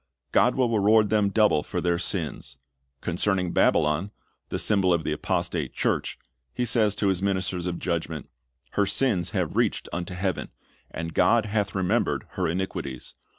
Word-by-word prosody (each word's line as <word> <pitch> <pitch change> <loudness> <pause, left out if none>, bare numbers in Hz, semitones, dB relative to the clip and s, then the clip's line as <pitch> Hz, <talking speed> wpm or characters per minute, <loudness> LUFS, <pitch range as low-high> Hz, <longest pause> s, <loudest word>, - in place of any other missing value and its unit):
God - - +4
will 125 -3 +2
reward 105 0 +4
them 105 -2 +3
double 105 -6 +3
for - - -4
their 85 -1 +1
sins. 80 -7 -2 0.4
Concerning 90 0 0
Babylon, 75 +6 +2 0.4
the - - -2
symbol 100 -4 +2
of 85 -2 +2
the - - -2
apostate - - -2
church, - - -1 0.4
He 125 - 0
says 110 -3 +2
to 100 -1 +1
His 95 -2 0
ministers 95 -2 -1
of 85 -1 -2
judgment, 85 -4 -3 0.4
"Her 100 -1 +1
sins 100 -10 +1
have - - -2
reached - - +1
unto 90 +1 -4
heaven, 95 0 -2 0.4
and 85 0 -5
God 115 -2 +4
hath 105 -2 -1
remembered 95 +5 0
her 90 -2 -1
iniquities. 80 -7 -4
95 Hz, 155 wpm, -26 LUFS, 85-105 Hz, 0.4 s, God